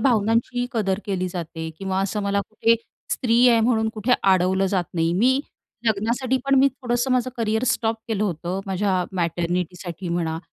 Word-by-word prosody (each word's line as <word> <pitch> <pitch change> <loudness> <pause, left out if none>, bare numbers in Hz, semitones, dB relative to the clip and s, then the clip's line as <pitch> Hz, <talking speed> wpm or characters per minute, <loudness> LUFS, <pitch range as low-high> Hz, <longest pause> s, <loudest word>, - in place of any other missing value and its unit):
भावनांची 235 +1 +1
कदर 200 -4 0
केली 185 -2 -2
जाते 165 -2 -5
किंवा 190 -1 -1
असं 205 +2 -2
मला 200 0 +1
कुठे 225 +1 +3 0.4
स्त्री 240 0 +3
आहे 230 -1 +5
म्हणून 220 -1 +2
कुठे 220 +3 0
अडवलं 190 0 +3
जात 185 -2 0
नाही. 165 0 +1
मी 255 +8 +3 0.5
लग्नासाठी 230 +5 +1
पण 275 0 +3
मी 275 +1 +6
थोडंसं 250 -1 -2
माझं 255 0 +1
करिअर 220 0 0
स्टॉप 225 -1 +1
केलं 215 -2 0
होतं. 180 0 -3
माझ्या 190 -1 0
मॅटर्निटीसाठी 175 +1 -2
म्हणा 165 -2 -1
200 Hz, 160 wpm, -23 LUFS, 180-235 Hz, 0.5 s, मी